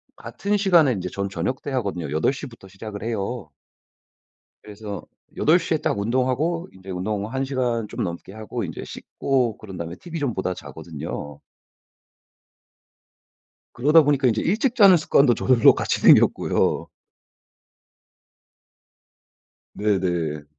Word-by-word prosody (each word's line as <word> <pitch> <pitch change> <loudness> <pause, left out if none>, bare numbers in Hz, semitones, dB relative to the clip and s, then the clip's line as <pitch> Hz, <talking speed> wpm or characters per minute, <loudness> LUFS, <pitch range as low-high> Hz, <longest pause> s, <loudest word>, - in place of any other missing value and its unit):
같은 205 +1 -2
시간에 175 -8 +4
인제 90 -4 -4
전 100 +2 -4
저녁 95 +9 -3
때 145 - -6
하거든요. 100 - -3
8 80 +10 +2
시부터 125 -8 -10
시작을 100 +2 -8
해요. 110 -4 -4 1.1
그래서 105 -3 -8 0.3
8 160 +4 +4
시에 165 -1 -1
딱 145 - -1
운동하고 130 - 0
인제 95 +1 -14
운동 100 +3 -2
1 135 +1 -1
시간 125 -5 -1
좀 - - -3
넘게 85 +1 -6
하고 110 -2 -5
인제 - - -6
씻고 125 -5 -2
그런 95 -4 -10
다음에 85 0 -6
TV 170 -1 -7
좀 140 -5 -1
보다 95 -2 -2
자거든요. 75 -4 -8 2.3
그러다 150 +6 +5
보니까 140 -2 +2
인제 110 -2 +1
일찍 225 +7 0
자는 195 -6 +7
습관도 140 -4 +3
저절로 125 0 +5
같이 - - -1
생겼고요. - - +3 2.9
네네. 90 -7 -1
115 Hz, 255 characters per minute, -23 LUFS, 95-140 Hz, 2.9 s, 자는